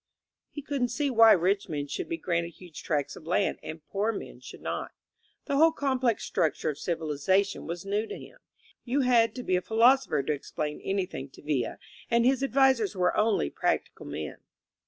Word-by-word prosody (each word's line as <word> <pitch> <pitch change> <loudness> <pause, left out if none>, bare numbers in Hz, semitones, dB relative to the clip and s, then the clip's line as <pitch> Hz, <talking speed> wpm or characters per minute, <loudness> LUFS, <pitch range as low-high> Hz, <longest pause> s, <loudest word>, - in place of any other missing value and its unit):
He 290 - -8
couldn't 275 -4 -1
see 275 +4 -1
why 225 -2 +8
rich 195 +3 +1
men 145 -3 -2
should 145 - -4
be 335 - -2
granted 170 - -2
huge 175 -4 -11
tracts 145 -3 -1
of 160 - -13
land 185 +3 +1
and 155 0 -8
poor 205 +3 0
men 215 - -8
should - - -11
not. - - -4 0.5
The 280 -2 0
whole 325 +2 +6
complex 260 -6 0
struc 155 -4 0
ture - - 0
of 145 - -11
civilization 170 +4 0
was 170 +2 -5
new 205 +3 -1
to - - -6
him. - - -13 0.4
You 265 +3 0
had 235 -3 +3
to 250 - -5
be 185 - +1
a - - -1
philosopher 230 - +3
to 150 - 0
explain 150 +1 -4
anything 185 -8 -3
to - - -16
Villa; 145 -4 -1 0.3
and 235 0 +3
his 265 0 +3
ad 275 - -1
visers 260 -6 +3
were 180 -1 +1
only 210 - +2
practical - - -2
men. 75 -2 -5
200 Hz, 195 wpm, -28 LUFS, 165-250 Hz, 0.5 s, why